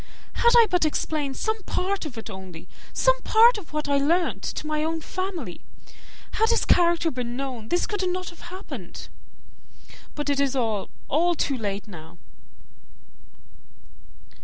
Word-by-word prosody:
Had 470 - +4
I 465 - +9
but 360 -3 +2
explained 300 -2 -1
some 440 0 -1
part 385 -2 -1
of 250 -6 -10
it 225 - -6
only 190 -5 -9 0.2
some - - +2
part 455 +1 +6
of 360 - -14
what 300 -1 -2
I 285 0 +3
learnt, 330 +6 +1
to - - -4
my 305 0 0
own 325 +1 -1
family! 345 - -5 0.7
Had 445 +1 +2
his 470 - +3
character 340 -1 +4
been 245 -1 -4
known, 255 -5 -5
this 350 - +2
could 390 -3 -1
not 365 0 -3
have 345 0 -12
happened. 375 +2 -8 1.1
But 295 -1 -3
it 285 -1 +1
is 280 -1 +1
all, 220 -6 -1 0.2
all 345 +4 +2
too 285 -3 0
late 205 -4 -3
now." 160 -5 -11
310 Hz, 155 wpm, -25 LUFS, 255-365 Hz, 1.1 s, I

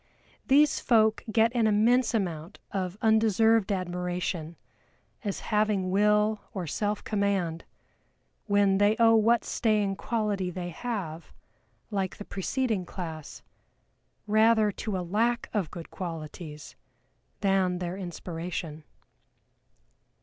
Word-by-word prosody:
These 290 +2 +4
folk 220 -2 +3
get 225 +2 +3
an 230 -2 +3
immense 230 +4 +3
amount 175 -3 -3
of 185 -1 -3
undeserved 220 -1 +3
admiration 180 -3 -3 0.7
as 200 -3 -3
having 210 -3 +1
Will 210 +2 +3
or 185 -3 -3
self 205 +6 -2
command, 195 -6 -1 0.8
when 200 -1 +3
they 205 +1 +4
owe 230 -1 +5
what 230 +2 +3
staying 210 -4 +1
quality 210 -5 -1
they 180 0 -5
have 175 -5 -5 0.6
(like 195 -3 -2
the 205 - -8
preceding 220 0 -1
class) 160 -4 -7 0.8
rather 215 0 +4
to 205 0 -4
a 180 - -3
lack 230 +6 0
of 200 -8 -1
good 170 0 -9
qualities 155 -3 -7 0.7
than 190 -2 +2
their 175 0 -4
inspiration. 170 -3 -6
200 Hz, 110 wpm, -28 LUFS, 180-220 Hz, 0.8 s, owe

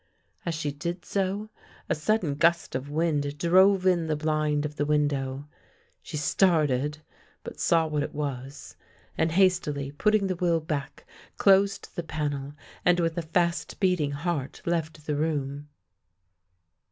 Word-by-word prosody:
As 165 - 0
she 150 -2 -2
did 170 +4 -5
so 200 +2 -2 0.4
a - - +1
sudden 165 -1 0
gust 170 +4 +2
of 130 +2 -4
wind 145 -2 0
drove 185 +4 +4
in 175 -3 +3
the 155 - 0
blind 155 -1 0
of 150 0 -5
the 145 - +1
window. 145 -2 0 0.5
She 155 - -6
started, 150 -3 +2 0.4
but - - -9
saw 165 -1 +3
what 150 -2 -1
it 145 - -4
was, 140 -2 -5 0.4
and, 160 - +1
hastily 165 -6 +2
putting 210 +7 +2
the 185 -1 -1
will 170 -2 +1
back, 150 -3 -5 0.3
closed 195 0 +3
the 175 - -2
panel, 145 -3 -3 0.3
and 180 0 +4
with 165 -1 0
a 170 - -1
fast 170 +2 -1
beating 180 -7 +1
heart, 145 -2 -3
left 160 -3 -2
the 150 - -1
room. 145 -1 -2
155 Hz, 145 wpm, -27 LUFS, 145-175 Hz, 0.5 s, drove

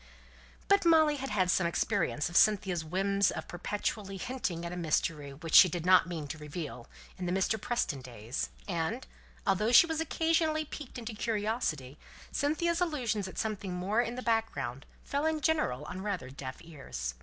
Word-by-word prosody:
But 400 0 +4
Molly 315 -3 +5
had 270 0 -4
had 185 -3 +2
some 175 -2 +2
experience 150 -2 0
of 175 - -8
Cynthia's 190 -5 +4
whim 195 +5 -1
of 160 - -6
perpetually 195 +2 -3
hinting 185 -7 -3
at 170 - -4
a - - -5
mystery 155 -3 -1
which 155 +4 -8
she 185 - +10
did 170 0 -4
not 185 0 +6
mean 160 -4 -4
to 155 - -6
reveal 150 -5 -6 0.3
in 180 - -3
the - - -1
Mr. 195 +3 +1
Preston 215 - -1
days, 120 0 -5 0.2
and, 185 +7 -2 0.4
although 210 +4 +2
she 250 - +9
was 320 -1 -2
occasionally 320 -1 +1
piqued 290 -3 -8
into 230 -1 -5
curiosity, 205 - -2 0.3
Cynthia's 335 +4 0
allusions 240 - 0
at 190 - -10
something 205 -4 -2
more 200 +6 +1
in 240 0 -3
the 255 - -5
background 220 - -1 0.2
fell 285 +3 -1
in 320 -1 0
general 315 0 +1
on 185 - -6
rather 185 -11 -3
deaf 130 -1 -7
ears. 135 - -6
195 Hz, 175 wpm, -31 LUFS, 160-245 Hz, 0.4 s, she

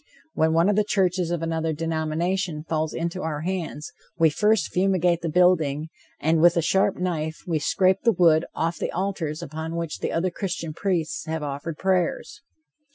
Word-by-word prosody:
When 160 0 +2
one 165 +3 +4
of 205 - +3
the 210 - +3
churches 185 -4 +1
of 170 -1 -2
another 165 -1 -1
denomination 160 +1 -2
falls 155 -1 -1
into 170 +2 -3
our 155 -2 -3
hands, 170 -3 -4 0.2
we 160 -2 +4
first 210 +5 +2
fumigate 180 -2 +2
the 170 - -2
building, 160 -3 +2 0.3
and 160 +1 +2
with 175 0 +5
a - - +4
sharp 190 +3 +2
knife 160 -3 -3
we 165 -4 0
scrape 185 +5 +2
the 235 - +5
wood 170 -4 +4
off 165 +1 -1
the - - -2
altars 175 -5 -3
upon 160 +3 -5
which 170 -2 -4
other 180 +2 0
Christian 170 -4 -4
priests 165 -4 -2
have 160 -1 -3
offered 145 +2 -5
prayers. 185 -3 -1
165 Hz, 170 wpm, -24 LUFS, 160-185 Hz, 0.3 s, with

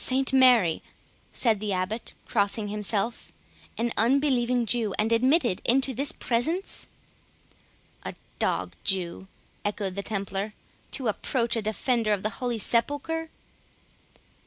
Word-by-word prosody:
"St 265 +1 +1
Mary," 245 -11 +5 0.5
said 225 -5 +2
the 210 -1 -1
Abbot, 185 +5 -2
crossing 205 0 0
himself, 210 +2 -2 0.5
"an 235 +1 0
unbelieving 250 0 +2
Jew, 225 -3 0
and 215 +2 +1
admitted 250 - +3
into 265 +2 +3
this 280 +6 +2
presence!" 320 - -1 1.1
"A - - -6 0.2
dog - - 0
Jew," 190 -1 -1 0.4
echoed 205 -2 -2
the 200 - -3
Templar, 200 0 -3 0.3
"to 260 -4 -2
approach 235 +3 0
a 225 - 0
defender 220 +1 +1
of 200 - -2
the 215 - 0
Holy 245 -2 0
Sepulchre?" 290 +9 0
230 Hz, 120 wpm, -27 LUFS, 205-255 Hz, 1.1 s, Mary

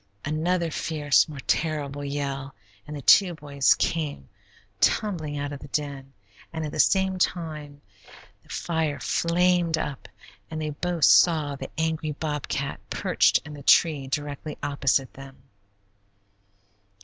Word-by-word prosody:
Another 165 +3 0
fierce, 150 -1 +2
more 145 -3 -7
terrible 145 -3 -1
yell, 140 -1 -4 0.3
and 150 0 -6
the 140 - -9
two 180 +3 +6
boys 140 -3 +2
came 150 - -2 0.5
tumbling 160 -8 0
out 145 0 -3
of 140 - -7
the 145 - -10
den, 140 -2 -4 0.4
and 160 -1 -4
at 150 - -5
the - - -6
same 190 +5 +3
instant 155 -5 -3 0.6
the - - -27
fire 160 -4 -2
flamed 170 +2 +2
up 145 -4 -5 0.4
and 160 - -5
they 155 -1 -3
both 170 +1 0
saw 155 -5 +5
the 135 -1 -7
angry 160 -1 -1
bobcat 145 -2 -3
perched - - +2
in 150 - -9
the 145 - -9
tree 145 -1 +4
directly 145 +2 -4
opposite 140 -2 0
them. 135 0 -11
150 Hz, 135 wpm, -25 LUFS, 140-160 Hz, 0.6 s, two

